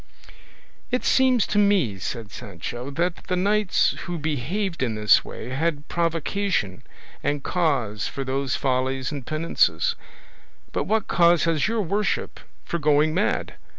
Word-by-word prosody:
"It 250 0 -1
seems 255 -4 +4
to 210 - +1
me," 185 - +2
said 110 +2 -5
Sancho, 120 +9 -6
"that 170 +5 -2
the 180 - 0
knights 205 +2 +2
who 175 -2 -3
behaved 160 - -2
in 120 -4 0
this 105 0 +5
way 120 - -8
had 150 +2 -1
provocation 170 - -1 0.4
and 145 0 -1
cause 135 - 0
for 135 - -4
those 135 0 -1
follies 130 0 -1
and 140 -3 -5
penances; 165 - +1 0.8
but - - -1
what 220 -1 0
cause 170 -2 +4
has 165 -3 +2
your 225 -1 0
worship 205 +4 -1 0.3
for 170 - -2
going 150 +1 +3
mad? 185 +5 -1
155 Hz, 140 wpm, -24 LUFS, 130-185 Hz, 0.8 s, this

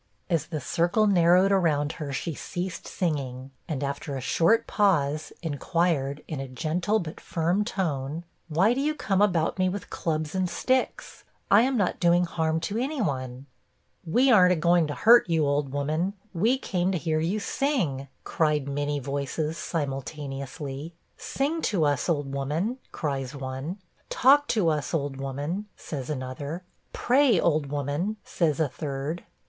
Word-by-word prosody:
As 165 -3 +1
the 155 -3 -3
circle 175 - +1
narrowed 180 0 +5
around 155 -6 +2
her, 150 -3 -6
she 160 +4 -3
ceased 180 +4 -5
singing, 135 -6 -3 0.2
and 145 -4 -3
after 140 0 -3
a - - -3
short 165 - +3
pause, 155 -7 +1
inquired, 150 -2 0
in 155 -4 -4
a 135 - -4
gentle 170 +10 0
but 165 -6 -5
firm 175 +5 0
tone, 160 - -2 0.2
'Why 180 +8 +3
do 265 - -1
you 305 +2 0
come 200 -9 0
about 180 -3 +2
me 185 0 +3
with 200 +2 -6
clubs 155 -2 -2
and 185 -1 0
sticks? 260 +8 -1 0.3
I 205 - +8
am 260 +1 +1
not 200 -4 0
doing 175 +1 +4
harm 160 -1 0
to 205 +6 -2
any 275 +4 -2
one.' 130 - -2 0.6
'We 245 +11 +3
ar'n't 180 -5 +7
a - - +1
going 170 0 +3
to 145 - -4
hurt 235 -4 +6
you, 160 -2 +2
old 140 -1 0
woman; 155 +7 -1 0.2
we 220 +9 +2
came 185 -7 -1
to 185 - 0
hear 160 -1 0
you 175 +7 0
sing,' 190 - -1 0.2
cried 150 -3 +1
many 145 +1 -1
voices, 140 +3 -2
simultaneously. 140 0 -5 0.2
'Sing 300 +5 -1
to 180 - +1
us, 145 +3 0
old 145 -4 -1
woman,' 160 - -1
cries 140 -3 -3
one. 135 +6 -5 0.3
'Talk 285 +3 +5
to 205 -8 +2
us, 150 -1 -1
old 140 -3 -2
woman,' 145 +9 -4
says 135 -4 -6
another. 145 +4 -4 0.3
'Pray, 255 -6 +3
old 155 -4 +2
woman,' 145 +9 -2
says 155 -4 0
a 160 - +3
third. 140 +4 -4
160 Hz, 160 wpm, -26 LUFS, 140-185 Hz, 0.6 s, I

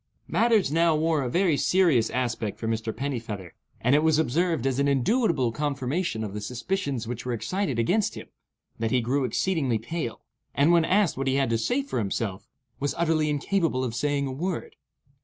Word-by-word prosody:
Matters 225 - +3
now 165 0 +3
wore 160 -1 +1
a 125 - -2
very 175 +2 +2
serious 155 -9 +3
aspect 120 -4 -2
for 115 - -4
Mr. 110 0 -1
Pennifeather, 115 -8 -5 0.3
and 125 +3 +2
it 150 - +5
was 160 -1 +3
observed, 160 0 +1
as 135 0 0
an 140 - +2
indubitable 140 - +2
confirmation 140 0 -2
of 105 -2 -5
the 105 - -4
suspicions 125 - -3
which 120 -1 -5
were 125 - -2
excited 155 - -2
against 200 - +1
him, - - -8 0.5
that 115 0 0
he 125 - +2
grew 130 +3 0
exceedingly 135 - 0
pale, 120 +2 -5 0.3
and 145 +4 +4
when 170 -2 +4
asked 190 -5 +2
what 135 0 -2
he 135 - +2
had 135 -3 +1
to 115 - +2
say 255 - 0
for 270 - -3
himself, 100 -2 -3 0.3
was 145 0 -1
utterly 160 -2 +1
incapable 150 -2 0
of 120 -3 -2
saying 140 +3 0
a 135 - -3
word. 170 +6 -4
140 Hz, 190 wpm, -26 LUFS, 120-165 Hz, 0.5 s, it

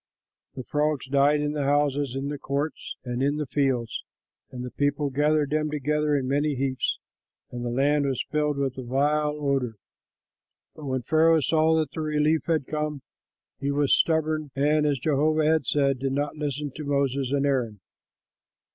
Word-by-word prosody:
The 130 - -5
frogs 150 0 -1
died 140 +2 +3
in 150 0 -1
the 150 -2 -2
houses, 145 -2 +1
in 135 +1 -3
the 145 -1 -5
courts, 140 +3 -3
and 125 0 -3
in 145 +2 +1
the 150 - -2
fields, 130 -4 -1 0.5
and 125 -1 -6
the 125 - -7
people 145 0 0
gathered 150 +1 +1
them 155 0 0
together 150 0 0
in 135 -2 -1
many 145 +2 +1
heaps; 130 -1 -1 0.5
and 120 0 -5
the 120 - -2
land 140 +3 +2
was 130 -3 -1
filled 150 -1 0
with 135 -2 -2
a - - -5
vile 150 +4 +1
odor. 135 -5 -1 1.0
But 155 - -10
when 130 -2 -2
Pharaoh 160 +3 +4
saw 160 +2 +3
that 155 -4 -1
relief 155 0 +1
had 160 -5 +1
come, 150 -2 -3 0.6
he 140 - -2
was 140 0 +2
stubborn 155 -2 +1
and, 150 +2 +2
as 145 -2 +1
Jehovah 155 +3 +1
had 160 0 +2
said, 140 -3 +2
did 135 0 -1
not 145 +2 -1
listen 145 -1 -3
to 155 - -5
Moses 140 -2 0
and 140 0 +1
Aaron. 125 -7 0
145 Hz, 175 wpm, -26 LUFS, 135-150 Hz, 1.0 s, Pharaoh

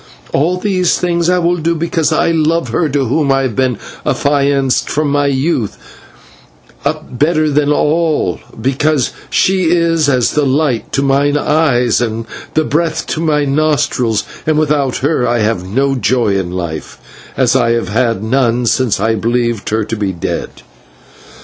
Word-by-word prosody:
All 170 +6 +1
these 185 -2 +1
things 170 -1 0
I 180 - +3
will 175 0 +1
do 170 +1 0
because 165 -1 0
I 160 +1 +2
love 165 +1 +1
her 165 -3 0
to 140 -1 0
whom 140 +3 +1
I 135 0 +2
have 125 -5 -2
been 130 -4 0 0.3
affianced 140 -2 +1
from 150 -1 0
my 145 0 +2
youth 135 - -1 1.1
up, 125 - -4
better 155 0 +2
than 145 +1 +2
them - - +3
all, 155 - +1 0.2
because 135 +2 0 0.2
she 190 -1 +2
is 165 -2 +2
as 125 -4 +2
the 150 - +1
light 135 -3 0
to 140 - +1
mine 140 +1 +2
eyes 135 -7 +2
and 115 -1 -2 0.3
the 155 - +3
breath 160 +2 -1
to - - -3
my 150 -3 +1
nostrils, 140 -6 +1 0.2
and 155 -1 +2
without 145 -4 +1
her 145 -5 +1
I 120 +1 +1
have 105 -4 -1
no 135 +6 +1
joy 125 -5 +1
in 95 -2 -1
life, 85 -4 -5 0.4
as 130 -1 +2
I 115 -3 +3
have 115 -5 -2
had 115 -1 0
none 120 0 +1
since 120 -2 +1
I 110 +2 +1
believed 115 0 -1
her 110 0 0
to 110 +2 -4
be 100 -3 -2
dead." 85 - -3
140 Hz, 170 wpm, -14 LUFS, 120-155 Hz, 1.1 s, I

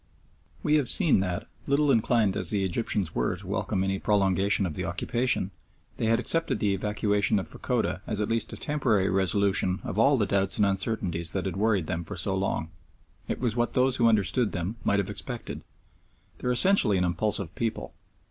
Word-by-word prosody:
We 155 -3 +3
have 140 -5 0
seen 170 - +4
that, 90 -2 -3 0.2
little 140 +1 +3
inclined 115 -4 +2
as 95 -5 +3
the 100 -2 +2
Egyptians 95 -3 -1
were 60 +8 0
to 95 +2 -11
welcome 100 0 -2
any 95 0 -1
prolongation 100 -1 +2
of 85 - -3
the - - -3
occupation, 120 -5 0 0.5
they 115 - -1
had 115 +1 +3
accepted 165 +6 0
the 100 -3 +1
evacuation 105 +1 0
of 95 -5 -3
Fachoda - - -2
as 105 - -2
at 105 - 0
least 115 0 -1
a - - -7
temporary 115 -11 0
resolution 95 0 +1
of 105 - -3
all 140 +4 +4
the 105 - +1
doubts 100 -1 0
and 105 - +3
uncertainties 95 -4 -1
that 95 -1 -2
had 95 - -3
worried 100 -3 +1
them 85 +1 -3
for - - -8
so 95 +2 0
long. 95 -4 -2 0.6
It - - -4
was 120 -3 0
what 120 0 0
those 130 0 +2
who 115 - +4
understand 110 +2 +1
them 90 +5 -3
might 100 - +2
have 100 0 -1
expected. 115 +4 -6 0.8
They - - -4
are - - +2
essentially 125 - +4
an 90 - +1
impulsive 90 0 -1
people. 115 -2 -4
100 Hz, 195 wpm, -27 LUFS, 95-115 Hz, 0.8 s, seen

